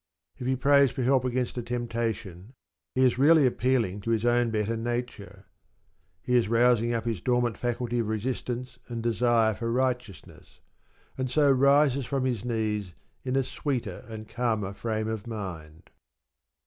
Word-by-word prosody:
If 125 - -4
he 130 - +2
prays 140 +1 +4
for 130 - -4
help 130 0 +3
against 125 0 -1
a - - -2
temptation, 115 -3 -4 0.4
he 130 0 +4
is 125 0 +2
really 155 +1 +6
appealing 120 -6 +1
to 115 - -5
his 115 0 +1
own 120 0 +3
better 110 0 -1
nature; 120 -2 -5 0.8
he 125 - 0
is 120 -3 +3
rousing 120 0 +3
up 115 -1 -2
his 115 -6 -2
dormant 120 -2 +1
faculty 120 0 -2
of 115 - -1
resistance 125 +2 -4
and 115 -2 -5
desire 115 -1 +2
for 115 +3 -3
righteousness, 125 - -3 0.6
and 130 -1 -1
so 145 +2 +4
rises 140 0 +3
from 135 -2 -1
his 120 -6 -1
knees 110 -5 -2 0.3
in 130 0 -2
a 135 - +3
sweeter 130 -1 -4
and 110 -1 -8
calmer 110 -5 -1
frame 110 0 -3
of 110 0 -4
mind. 90 -7 -7
120 Hz, 160 wpm, -27 LUFS, 110-125 Hz, 0.8 s, really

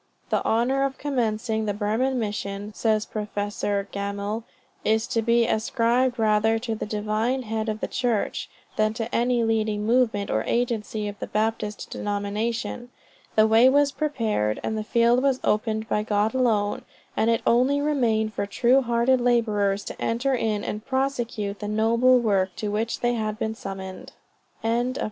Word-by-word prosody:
The - - +1
honor 245 +4 +1
of 275 -1 -2
commencing 225 -5 -1
the 205 -2 -1
Burman 225 +6 0
Mission, 205 -2 -4
says 215 -1 +1
Prof. 210 -1 -6
Gammell, 205 +1 -2 0.4
"is 220 +1 +2
to 230 - 0
be 235 +1 +3
ascribed 235 +3 +1
rather 220 0 +3
to 225 0 -3
the 215 - -4
Divine 215 +5 -1
Head 220 0 -2
of 215 0 -3
the - - -1
Church, 240 -4 -1 0.3
than 215 0 +2
to 225 +1 -4
any 240 0 +2
leading 215 -2 0
movement 225 -4 +2
or - - +1
agency 225 -3 -1
of 205 0 -7
the - - -4
Baptist 215 -1 -2
denomination. 215 +4 -3 0.5
The 215 - +6
way 225 +3 +6
was 285 +1 +3
prepared 225 - -1
and 220 - -2
the 215 - -2
field 235 +3 +3
was 270 -1 +2
opened 220 +1 0
by 210 - +1
God 210 0 0
alone, 220 -6 +1 0.3
and 225 - +2
it 230 - +1
only 255 +4 +3
remained 235 -7 +1
for 200 - -2
true 250 +5 +3
hearted 240 +1 +2
laborers 210 -5 +1
to - - -8
enter 245 +4 0
in 220 -4 0
and 210 +1 -4
prosecute 240 -6 -2
the 210 - -4
noble 230 +4 +4
work 195 -6 +1
to 210 - -3
which 220 +2 -2
they 240 0 +2
had 215 -2 -2
been 220 0 -2
summoned." 190 -3 -8 0.5
CHAPTER 235 +2 +1
IV. 255 - -5
220 Hz, 165 wpm, -25 LUFS, 210-240 Hz, 0.5 s, The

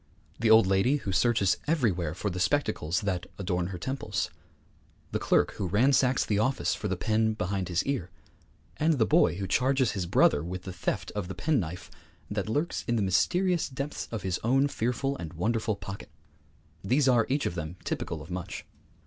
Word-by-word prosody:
The 115 -1 +2
old 110 -2 +7
lady 95 +8 +3
who 120 -9 -3
searches 100 -2 +2
everywhere 95 - +1
for 100 +3 -2
the 90 - -4
spectacles 95 - 0
that 90 -3 -2
adorn 90 -3 -1
her 95 -1 -5
temples; 130 +9 -3 0.8
the - - -1
clerk - - +2
who 95 - -3
ransacks 125 +6 +3
the 105 -1 0
office 130 +5 +1
for 105 - -3
the 95 -2 -2
pen 110 +2 +1
behind 95 -2 -2
his 85 -1 +1
ear; 135 -11 -2 0.7
and 160 +2 +3
the 115 -5 +3
boy 155 - +4
who 95 +1 -3
charges 130 +6 +2
his 95 -4 -3
brother 75 -3 +4
with 90 +2 -5
the 95 - -6
theft 90 - -3
of 105 -4 -3
the 95 - -6
pen 150 -3 +1
knife 90 -1 -6 0.4
that 105 0 -2
lurks 150 +9 -1
in 120 - +1
the 110 - +1
mysterious 175 - +2
depths 140 +2 -5
of 115 -3 -4
his 95 -1 -1
own 135 +5 +3
fearful 135 +2 -1
and 80 -1 -7
wonderful 110 +5 0
pocket 100 0 -8 0.7
these 130 +7 +2
are 120 -4 +4
each 140 +2 0
of - - -1
them 80 0 -5
typical - - -3
of - - -12
much. 90 -1 -5
105 Hz, 190 wpm, -28 LUFS, 90-130 Hz, 0.8 s, old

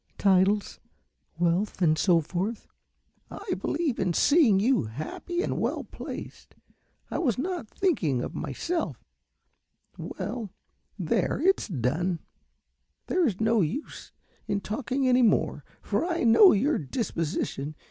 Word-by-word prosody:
"Titles, 195 +1 +2 0.6
wealth 175 +5 0
and 160 -4 +4
so 170 0 +3
forth." 190 +8 -3 0.6
"I - - -5
believe 305 -5 -1
in 185 -2 +1
seeing 285 - +5
you 245 - +2
happy 155 - -4
and - - -2
well - - -1
placed. - - -9 0.6
I - - -1
was 255 - +1
not 345 -2 -3
thinking 165 - 0
of - - -5
myself 330 - -3 0.9
well, 230 -5 -5 0.5
there, - - 0
it's 385 +4 +2
done. 165 - -1 0.9
There 365 -3 +2
is 195 -6 -2
no 220 0 +3
use 235 - -4 0.4
in 200 - -1
talking 260 +5 -2
any 255 0 +4
more, 230 - +2 0.2
for - - 0
I 340 -3 -1
know 240 - +8
your 265 +10 +2
disposition. 155 - -3
210 Hz, 125 wpm, -27 LUFS, 175-280 Hz, 0.9 s, know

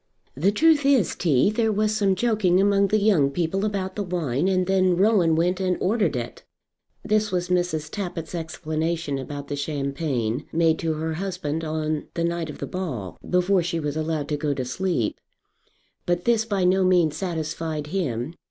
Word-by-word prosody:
"The 175 +9 +2
truth 305 +6 +4
is, 270 - +3
T., 160 +2 +2
there 225 0 +1
was 215 +1 +1
some 200 -3 +2
joking 200 -4 +2
among 200 0 +3
the 215 - +2
young 200 -10 +3
people 175 +6 -1
about 195 -3 -2
the 210 - -2
wine, 170 -5 -1
and 185 -1 +2
then 185 -1 +2
Rowan 190 -5 +4
went 180 +3 +1
and 185 -1 0
ordered 205 - +1
it." 120 -1 -5 0.6
This 215 0 +1
was 180 -1 -1
Mrs. 175 -4 0
Tappitt's 175 -5 -5
explanation 160 -2 -2
about 140 +1 -6
the 145 - -3
champagne, 140 -4 -2
made 165 -1 +2
to 165 -1 0
her 160 +1 -3
husband 165 -3 -3
on 155 -1 -2
the 170 - -1
night 170 -1 -1
of 150 - -7
the - - -4
ball, 130 - -5
before 180 +1 +3
she 170 0 -2
was 150 -2 -3
allowed 155 -2 -2
to 150 - 0
go 145 -1 -1
to 130 - -3
sleep. 165 - -1 0.9
But 175 0 0
this 230 -2 +3
by 200 -4 0
no 185 +1 +3
means 175 -4 +3
satisfied 160 -3 -3
him. 150 -6 -2
175 Hz, 180 wpm, -24 LUFS, 155-195 Hz, 0.9 s, truth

